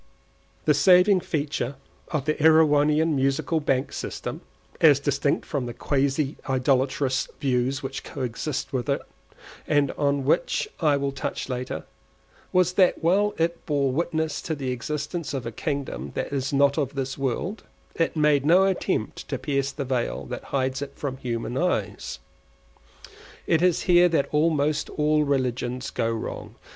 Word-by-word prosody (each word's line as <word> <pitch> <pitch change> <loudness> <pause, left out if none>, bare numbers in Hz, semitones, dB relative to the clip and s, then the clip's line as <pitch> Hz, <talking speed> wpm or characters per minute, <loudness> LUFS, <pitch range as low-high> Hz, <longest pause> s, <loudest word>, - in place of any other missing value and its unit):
The 150 - +5
saving 180 +6 +5
feature 145 -5 -2 0.3
of 145 -3 -2
the 155 - +2
Erewhonian 155 0 +4
Musical 135 +4 +1
Bank 135 -3 0
system - - -5 0.4
(as 145 -4 +6
distinct 140 0 0
from 135 -5 -3
the 120 - -6
quasi 140 +2 0
idolatrous 130 0 +1
views 130 +1 0
which 135 0 -5
coexist 130 +2 -4
with 125 -4 -2
it, - - 0 0.6
and 145 -2 +2
on 140 -2 0
which 465 - +1
I 150 -4 +3
will 140 0 -1
touch 135 0 -4
later) 125 0 -4 0.7
was 180 0 +3
that 185 -3 +3
while 200 +5 +3
it 170 +1 -1
bore 140 -3 +1
witness 160 +1 -1
to 160 - -3
the 135 -3 -3
existence 150 +5 -4
of 130 -3 -4
a 115 - -3
kingdom 120 - -4
that - - -3
is 135 -1 -1
not 140 +1 +3
of 140 -1 -2
this 135 0 -2
world, 140 - -2 0.3
it 165 - 0
made 150 -3 +3
no 175 +6 +5
attempt 190 - -1
to 135 - -2
pierce 140 0 -1
the 140 -1 -5
veil 125 -2 -2
that - - -6
hides 130 0 -1
it 140 -1 -5
from 135 -3 -4
human 120 0 -3
eyes. - - -1 1.3
It 160 -1 +2
is 180 -2 +2
here 180 -1 +5
that 160 -4 +1
almost 150 -1 +1
all 150 0 +2
religions 130 -2 -1
go 115 - 0
wrong. 115 -1 -5
140 Hz, 150 wpm, -25 LUFS, 130-155 Hz, 1.3 s, as